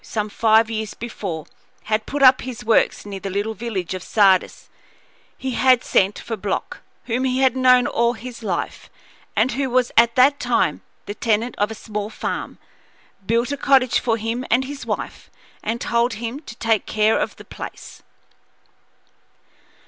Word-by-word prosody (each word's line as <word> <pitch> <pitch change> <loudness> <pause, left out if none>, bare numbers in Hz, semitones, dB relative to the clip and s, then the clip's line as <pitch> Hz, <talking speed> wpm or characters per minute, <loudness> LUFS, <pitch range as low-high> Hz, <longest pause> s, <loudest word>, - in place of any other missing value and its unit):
But - - -17
when - - -11
Roland - - +4
Clewe, 210 - -16
some - - -22
five 225 0 +4
years 220 -1 -3
before, 195 -9 -5 0.4
had 215 0 -1
put 285 -1 -1
up 255 0 +7
his 250 -4 -7
works 225 -2 +2
near 200 -1 -6
the 195 - -5
little 205 +3 -2
village 200 -5 -4
of 185 - -5
Sardis, 195 -2 +2 0.7
he 265 - -4
had 255 0 +4
sent 195 +1 +2
for 225 - -5
Block, 200 -2 -4 0.3
whom 245 +2 -1
he 260 0 0
had 260 -2 +3
known 255 -1 +5
all 235 +1 +1
his 245 +1 -9
life 190 -6 -4 0.5
and 260 - +2
who 270 +1 -1
was 250 0 +1
at 230 0 +5
that 275 +3 +5
time - - +1 0.2
the 205 - -5
tenant 225 +2 0
of 205 +1 +2
a 225 - -6
small 210 -1 -5
farm, - - -5 0.7
built 235 +3 +1
a 285 - -2
cottage 265 -3 +3
for 230 -2 0
him 230 +3 -3
and 250 +3 +2
his 280 +1 -8
wife, - - -5 0.3
and 225 +2 -2
told 235 +1 +1
him 230 +5 -5
to 260 -7 -11
take 225 -3 0
care 215 +1 +2
of - - -2
the - - -13
place. - - -9
230 Hz, 180 wpm, -21 LUFS, 215-255 Hz, 0.7 s, up